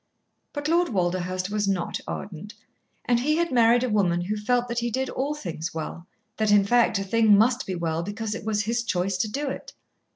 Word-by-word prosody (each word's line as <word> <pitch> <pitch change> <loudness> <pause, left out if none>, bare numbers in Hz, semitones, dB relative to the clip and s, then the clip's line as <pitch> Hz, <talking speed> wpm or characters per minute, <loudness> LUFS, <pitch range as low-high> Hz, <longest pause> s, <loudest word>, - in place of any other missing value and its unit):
But 290 0 -3
Lord 345 +2 +2
Walderhurst 185 -1 -1
was 210 -1 0
not 190 -3 -1
ardent, 195 +2 -7 0.5
and 240 -1 +2
he 300 +5 +1
had 340 +1 0
married 240 0 +4
a 255 - 0
woman 180 -5 +2
who 195 +5 -2
felt 245 +4 0
that 235 0 -2
he 240 0 -1
did 260 +3 -2
all 285 +3 -2
things 170 - -5
well 165 +2 -6 0.3
that, 215 -1 +1
in 205 -1 +6
fact, 235 0 +3
a 195 - -2
thing 215 +1 +4
must 240 +5 +2
be 190 - -2
well 165 -1 -1
because 210 +4 -4
it 225 - -6
was 215 -1 0
his 230 +3 0
choice 190 -3 -1
to 215 - 0
do 285 +7 -3
it. - - -6
215 Hz, 215 wpm, -25 LUFS, 185-245 Hz, 0.5 s, in